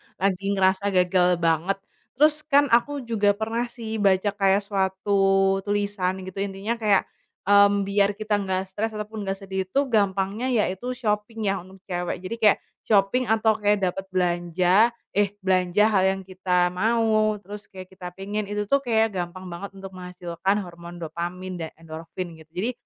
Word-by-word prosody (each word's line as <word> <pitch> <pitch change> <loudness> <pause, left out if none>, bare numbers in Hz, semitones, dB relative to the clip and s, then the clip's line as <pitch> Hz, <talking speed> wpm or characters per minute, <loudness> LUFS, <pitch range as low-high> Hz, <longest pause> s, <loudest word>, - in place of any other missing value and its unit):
lagi 195 +1 0
ngerasa 190 +1 +2
gagal 180 -1 +3
banget. 165 +4 +2 0.4
Terus 300 +2 +2
kan 285 -1 +4
aku 270 +4 +2
juga 210 -4 +2
pernah 225 +3 -2
sih 225 -2 -6
baca 195 0 +3
kayak 195 0 +2
suatu 195 0 +2
tulisan 205 -2 0
gitu 185 +1 -7
intinya 200 +4 -3
kayak, 210 -3 +3 0.4
mmm, 200 0 +5
"Biar 200 0 +1
kita 210 0 -1
nggak 190 -1 -2
stres 220 +3 -3
ataupun 210 -1 -5
nggak 195 - 0
sedih 190 -1 -3
itu 230 - +1
gampangnya 200 +2 +1
yaitu 240 0 -1
shopping 215 -1 -2
ya 195 - -2
untuk 190 +1 -15
cewek." 175 0 -3
Jadi 185 +5 -4
kayak 215 -3 +5 0.2
shopping 205 +4 +2
atau 220 0 +3
kayak 210 0 +3
dapat 195 +1 -6
belanja 180 +4 +3 0.2
eh, 205 0 +1
belanja 190 +3 +3
hal 190 -3 +3
yang 190 0 0
kita 180 -1 0
mau 215 +2 +2
terus 205 +2 -9
kayak 185 -1 -11
kita 180 -1 -9
pengen, 205 +2 -4
itu 205 +1 -2
tuh 275 +7 +2
kayak 225 -4 +1
gampang 185 0 -5
banget 195 +3 -7
untuk 195 0 -9
menghasilkan 180 +1 -3
hormon 170 -1 -10
dopamin 175 +3 -5
dan 160 - -3
endorfin, 165 +2 -7
gitu. 160 - -16
Jadi, 215 +7 -1
195 Hz, 165 wpm, -24 LUFS, 185-215 Hz, 0.4 s, mmm